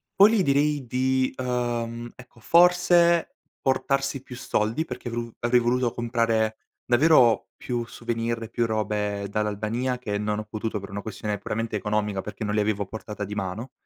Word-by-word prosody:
Poi, 200 +2 +7
gli 220 -4 +3
direi 145 -1 +2
di 130 +1 +1
uhm, 120 -2 -2
ecco, 125 -1 -16
forse, 175 +3 +4 0.2
portarsi 135 0 0
più 125 -1 -10
soldi 115 +6 -1
perché 120 - -6
vru 115 0 -4
avrei 120 +1 +3
voluto 120 0 +1
comprare 115 -2 0 0.3
davvero 125 -3 +5
più 120 -2 -3
souvenir, 115 -1 -3
più 120 0 0
robe 105 -2 -1
dall'Albania, 110 +5 -1
che 105 -5 -3
non 105 0 -1
ho - - -4
potuto 110 0 -3
per 100 - -9
una 100 +1 -4
questione 105 -1 -4
puramente 115 +2 -3
economica, 105 -1 -1
perché - - -7
non 105 -1 -1
li 105 - +3
avevo 105 -1 0
a - - -8
portata 105 -1 -6
di 100 - -6
mano. 100 +6 -4
115 Hz, 165 wpm, -25 LUFS, 105-130 Hz, 0.3 s, Poi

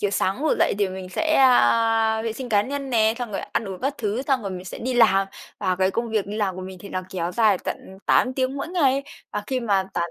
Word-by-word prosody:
Kiểu 205 - 0
sáng 195 +3 0
ngủ 315 - +2
dậy - - +3
thì 200 -2 +2
mình 185 0 -7
sẽ, 315 - 0
a, 225 -4 +4
vệ 225 -1 -2
sinh 250 +2 -7
cá 205 -3 +3
nhân 275 +3 -5
nè, 220 -2 +3
xong 245 -3 -4
rồi - - -2
ăn - - -3
uống 190 - -7
các 275 +3 -1
thứ, 215 +3 -1
xong 270 -3 0
rồi 200 - -4
mình 185 -1 -6
sẽ 185 - -7
đi 255 +2 -2
làm, 195 -5 +4 0.3
và 185 -3 0
cái 190 +1 +2
công 230 +2 -2
việc 215 -3 0
đi 205 +1 -5
làm 200 -4 -1
của 185 - -6
mình 185 0 -8
thì 200 - -10
nó 185 -1 -3
kéo 175 -2 -3
dài 210 -1 +3
tận 190 - -6
8 255 - +3
tiếng 260 +1 -1
mỗi 280 - -4
ngày. 280 -6 +2 0.3
Và 210 - -2
khi 260 0 -1
mà 200 -4 +1
tản 170 0 -1
220 Hz, 275 wpm, -23 LUFS, 190-255 Hz, 0.3 s, a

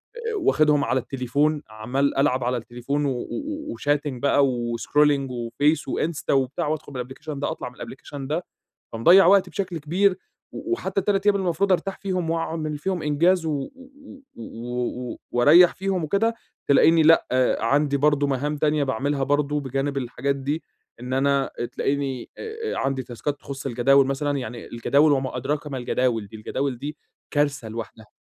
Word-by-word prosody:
آآ، 460 -1 -4
واخدهم 150 - +3
على 130 - +1
التليفون 140 +4 0
عمَّال 125 +7 -1
العب 135 -3 +2
على 125 +1 0
التليفون 120 +5 -3
و 140 - +1
و 305 - -5
وchatting 145 0 +1 0.2
بقى 140 0 +3 0.3
وscrolling 145 +3 +2
وface 125 +6 0
وinsta 160 -2 -2
وبتاع 135 +1 0
وأدخل 155 -1 -3
من - - -11
الأبلكيشن 130 +4 -6
ده 145 - -1
أطلع 160 - -5
من 125 - -19
الأبليكيشن 135 +1 -8
ده، 160 +5 -2 0.5
فمضيّع 170 +12 +6
وقتي 195 +1 +5
بشكل 185 -4 -3
كبير 185 +5 +1 0.4
وحتى 200 - -2
ال3 195 +1 0
أيام 205 -1 +5
المفروض 190 0 +1
أرتاح 195 +2 -1
فيهم 185 -4 -2
وأعمل 160 -2 -2
فيهم 185 +1 -2
إنجاز، 165 +4 +2
و 145 -3 -2 0.7
و 120 +2 -5
و - - -10
واريّح 155 +9 +6
فيهم 190 -3 -1
وكده، 210 +8 +1 0.3
تلاقيني 160 +3 +5
لأ 165 +1 +5 0.3
عندي 140 +5 +2
برضه 145 0 +2
مهام 140 +2 -1
تانية 150 0 +1
باعملها 135 +2 -1
برضه 145 +1 +1
بجانب 135 +1 -2
الحاجات 135 +2 -2
دي 145 +4 -3 0.4
إن 125 +1 -6
أنا 140 +1 +2 0.2
تلاقيني 135 -3 -2
آآ، 450 0 -5
عندي 135 -1 -1
تاسكات 125 +4 -5
تخص 140 0 -7
الجداول 135 +2 +4
مثلًا، 140 +1 -1
يعني 120 -2 -6
الجداول 140 +6 +3
وما 130 -2 -1
أدراك 145 +4 -2
ما 135 -3 -4
الجداول 120 -3 0
دي 110 - -11
الجداول 130 +4 -3
دي 145 +4 -6 0.3
كارثة 145 -5 0
لوحدها. 110 0 -8
145 Hz, 155 wpm, -24 LUFS, 130-160 Hz, 0.7 s, فمضيّع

